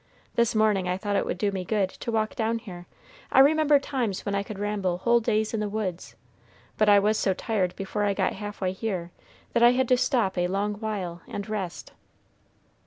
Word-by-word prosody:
This 235 Hz, -1 st, +1 dB
morning 210 Hz, -4 st, +2 dB
I 180 Hz, -, 0 dB
thought 205 Hz, +1 st, -2 dB
it -, -, +1 dB
would -, -, -2 dB
do 200 Hz, +2 st, 0 dB
me 190 Hz, -2 st, -3 dB
good 200 Hz, +1 st, +1 dB
to 235 Hz, -, -6 dB
walk 220 Hz, -1 st, 0 dB
down 225 Hz, 0 st, 0 dB
here. 180 Hz, -6 st, -10 dB, 0.4 s
I -, -, 0 dB
remember 295 Hz, +2 st, +6 dB
times 255 Hz, -8 st, -3 dB
when 200 Hz, -, -2 dB
I 200 Hz, -, +1 dB
could 200 Hz, 0 st, -7 dB
ramble 200 Hz, -3 st, -1 dB
whole 235 Hz, +5 st, +3 dB
days 220 Hz, -1 st, 0 dB
in 225 Hz, -, 0 dB
the 210 Hz, -1 st, -2 dB
woods, 200 Hz, -4 st, -4 dB, 0.6 s
but 215 Hz, -1 st, +3 dB
I 205 Hz, -, +7 dB
was 210 Hz, +2 st, +2 dB
so 190 Hz, -2 st, +1 dB
tired 190 Hz, -5 st, -1 dB
before 195 Hz, +1 st, -4 dB
I 200 Hz, -1 st, +1 dB
got 190 Hz, -1 st, 0 dB
half 205 Hz, +1 st, -7 dB
way 185 Hz, -1 st, +1 dB
here 185 Hz, -3 st, -4 dB, 0.4 s
that 235 Hz, -, +2 dB
I 240 Hz, +1 st, +7 dB
had 260 Hz, 0 st, +1 dB
to 255 Hz, -, +5 dB
stop 240 Hz, -7 st, +1 dB
a 175 Hz, -, +2 dB
long 200 Hz, +3 st, -1 dB
while 195 Hz, -6 st, -4 dB
and 200 Hz, -1 st, -5 dB
rest. 195 Hz, -5 st, -5 dB
210 Hz, 215 wpm, -26 LUFS, 190-225 Hz, 0.6 s, I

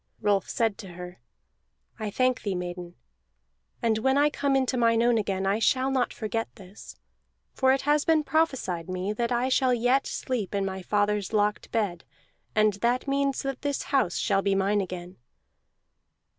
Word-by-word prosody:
Rolf 200 Hz, -3 st, +1 dB
said 225 Hz, -3 st, 0 dB
to 190 Hz, -5 st, -9 dB
her: 180 Hz, +1 st, -9 dB, 0.8 s
"I 215 Hz, -1 st, -3 dB
thank 255 Hz, +4 st, +1 dB
thee, 200 Hz, -3 st, -2 dB
maiden; 175 Hz, -1 st, -6 dB, 0.9 s
and 220 Hz, -2 st, +2 dB
when 265 Hz, +4 st, +2 dB
I 295 Hz, +1 st, +4 dB
come 280 Hz, -1 st, 0 dB
into 260 Hz, -1 st, +1 dB
mine 230 Hz, -1 st, +3 dB
own 240 Hz, -1 st, +3 dB
again 195 Hz, -2 st, -2 dB
I 200 Hz, +3 st, +1 dB
shall 260 Hz, +3 st, +2 dB
not 260 Hz, -2 st, +1 dB
forget 225 Hz, +1 st, -3 dB
this. 195 Hz, -1 st, -12 dB, 0.6 s
For 260 Hz, -1 st, +3 dB
it 270 Hz, -, +2 dB
has 295 Hz, +1 st, +2 dB
been 320 Hz, -2 st, +3 dB
prophesied 265 Hz, -, 0 dB
me 185 Hz, +3 st, -2 dB
that 235 Hz, +2 st, -2 dB
I 245 Hz, +1 st, +1 dB
shall 260 Hz, -1 st, +3 dB
yet 245 Hz, +3 st, +2 dB
sleep 230 Hz, -7 st, -3 dB
in 200 Hz, -1 st, 0 dB
my 190 Hz, 0 st, -4 dB
father's 205 Hz, +1 st, 0 dB
locked 210 Hz, 0 st, 0 dB
bed, 200 Hz, -7 st, -1 dB, 0.5 s
and 215 Hz, -1 st, +4 dB
that 245 Hz, +3 st, +1 dB
means 275 Hz, -1 st, 0 dB
that 275 Hz, -1 st, -4 dB
this 285 Hz, -1 st, -2 dB
house 260 Hz, -11 st, +2 dB
shall 195 Hz, -2 st, +1 dB
be 195 Hz, 0 st, +1 dB
mine 200 Hz, +1 st, +2 dB
again." 180 Hz, -1 st, -7 dB
220 Hz, 170 wpm, -27 LUFS, 195-260 Hz, 0.9 s, I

